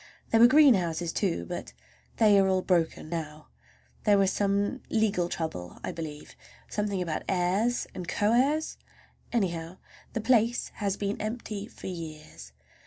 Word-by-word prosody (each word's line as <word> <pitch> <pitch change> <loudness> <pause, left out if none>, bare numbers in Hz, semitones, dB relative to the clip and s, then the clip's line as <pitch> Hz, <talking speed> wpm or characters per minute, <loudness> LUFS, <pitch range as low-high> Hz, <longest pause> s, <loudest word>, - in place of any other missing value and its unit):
There 225 - +4
were 235 - +9
greenhouses, 185 - +4
too, 170 - -1
but - - -6 0.4
they 210 -3 +6
are 195 - +4
all 185 -1 +1
broken 170 -4 0
now. 155 -2 -6 0.5
There 205 -2 +5
was 195 -1 +3
some 200 +6 0
legal 210 -6 +1
trouble, 90 - -5
I - - -3
believe, 155 -3 -8 0.3
something 205 -3 -1
about 160 -3 -4
the - - 0
heirs 190 +7 +1
and 180 -2 -6
co 205 +5 +1
heirs; 290 +6 +1 0.5
anyhow, 175 -6 -2 0.4
the 230 - -2
place 235 +1 +2
has 200 -2 -1
been 200 0 -2
empty 215 -2 -4
for - - -13
years. 155 - -8
195 Hz, 150 wpm, -28 LUFS, 170-220 Hz, 0.5 s, were